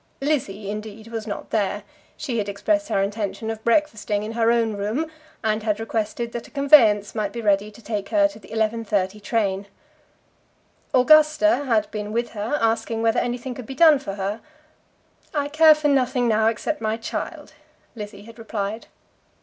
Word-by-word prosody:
Lizzie, 215 Hz, -9 st, -2 dB
indeed, 215 Hz, +1 st, -7 dB
was 225 Hz, -1 st, -5 dB
not 205 Hz, -, -6 dB
there. 205 Hz, -1 st, 0 dB, 0.3 s
She 255 Hz, -7 st, -2 dB
had 205 Hz, -1 st, -2 dB
expressed 305 Hz, +10 st, 0 dB
her 195 Hz, -, +2 dB
intention 210 Hz, +2 st, -3 dB
of 220 Hz, 0 st, -7 dB
breakfasting 225 Hz, -6 st, +1 dB
in 215 Hz, -, -5 dB
her 230 Hz, 0 st, +2 dB
own 230 Hz, -2 st, +1 dB
room, 220 Hz, +11 st, -2 dB, 0.3 s
and 215 Hz, 0 st, 0 dB
had 210 Hz, -1 st, -1 dB
requested 225 Hz, +1 st, -3 dB
that 235 Hz, -, -6 dB
a -, -, -17 dB
conveyance 245 Hz, -8 st, +5 dB
might 210 Hz, -3 st, -2 dB
be 235 Hz, -, -6 dB
ready 205 Hz, -1 st, +2 dB
to 215 Hz, +2 st, -16 dB
take 210 Hz, -3 st, -4 dB
her 305 Hz, -1 st, +4 dB
to 295 Hz, -, -13 dB
the 205 Hz, -, -16 dB
11.30 215 Hz, -3 st, -1 dB
train. 200 Hz, -2 st, -1 dB, 1.2 s
Augusta 305 Hz, +2 st, +5 dB
had 225 Hz, -5 st, +2 dB
been 210 Hz, -1 st, -4 dB
with 235 Hz, +2 st, -1 dB
her, 220 Hz, +7 st, -2 dB
asking 225 Hz, 0 st, 0 dB
whether 225 Hz, -1 st, +3 dB
anything 245 Hz, +1 st, -3 dB
could 245 Hz, -3 st, -9 dB
be 270 Hz, -, -7 dB
done 310 Hz, -1 st, +6 dB
for 200 Hz, -8 st, -6 dB
her. 200 Hz, +3 st, -3 dB, 0.9 s
"I 290 Hz, -1 st, 0 dB
care 310 Hz, +1 st, +7 dB
for 305 Hz, 0 st, 0 dB
nothing 260 Hz, -3 st, +2 dB
now, 220 Hz, -1 st, +3 dB
except 235 Hz, +7 st, -1 dB
my 220 Hz, 0 st, -1 dB
child," 230 Hz, -, -6 dB, 0.4 s
Lizzie 205 Hz, -2 st, -8 dB
had 230 Hz, +1 st, -14 dB
replied. 220 Hz, -1 st, -4 dB
225 Hz, 175 wpm, -23 LUFS, 210-250 Hz, 1.2 s, care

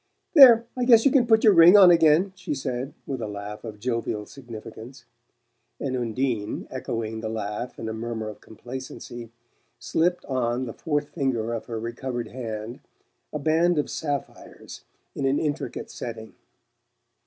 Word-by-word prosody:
"There! 245 Hz, -7 st, +9 dB
I 250 Hz, -, -1 dB
guess 235 Hz, -2 st, +6 dB
you 275 Hz, -, +5 dB
can 255 Hz, -4 st, +3 dB
put 220 Hz, -1 st, +4 dB
your 215 Hz, -, +7 dB
ring 170 Hz, +3 st, +8 dB
on 185 Hz, -3 st, +9 dB
again," 165 Hz, +3 st, +4 dB
she 180 Hz, -5 st, -4 dB
said 130 Hz, 0 st, -4 dB
with 130 Hz, -3 st, -4 dB
a 110 Hz, -, -3 dB
laugh 105 Hz, 0 st, -7 dB
of 110 Hz, -3 st, -8 dB
jovial 115 Hz, -2 st, -2 dB
significance; 120 Hz, +1 st, -11 dB, 0.7 s
and 130 Hz, -2 st, -2 dB
Undine, 120 Hz, -2 st, -2 dB
echoing 115 Hz, -4 st, -4 dB
the 110 Hz, -, -4 dB
laugh 110 Hz, +2 st, -5 dB
in 110 Hz, -, -6 dB
a 110 Hz, -, -3 dB
murmur 110 Hz, -1 st, -4 dB
of 105 Hz, -, -9 dB
complacency, 120 Hz, 0 st, -9 dB, 0.5 s
slipped 170 Hz, +8 st, 0 dB
on 125 Hz, -1 st, -1 dB
the 115 Hz, -, -6 dB
fourth 145 Hz, -2 st, -2 dB
finger 120 Hz, -6 st, -2 dB
of 115 Hz, -, -5 dB
her 115 Hz, -2 st, -4 dB
recovered 120 Hz, +1 st, -5 dB
hand 115 Hz, -2 st, -6 dB, 0.5 s
a -, -, -3 dB
band 160 Hz, +3 st, +2 dB
of 150 Hz, -, -1 dB
sapphires 145 Hz, -3 st, -6 dB, 0.3 s
in 140 Hz, -, -3 dB
an 135 Hz, +2 st, +2 dB
intricate 150 Hz, -2 st, -3 dB
setting. 110 Hz, -2 st, -7 dB
130 Hz, 155 wpm, -25 LUFS, 115-155 Hz, 0.7 s, There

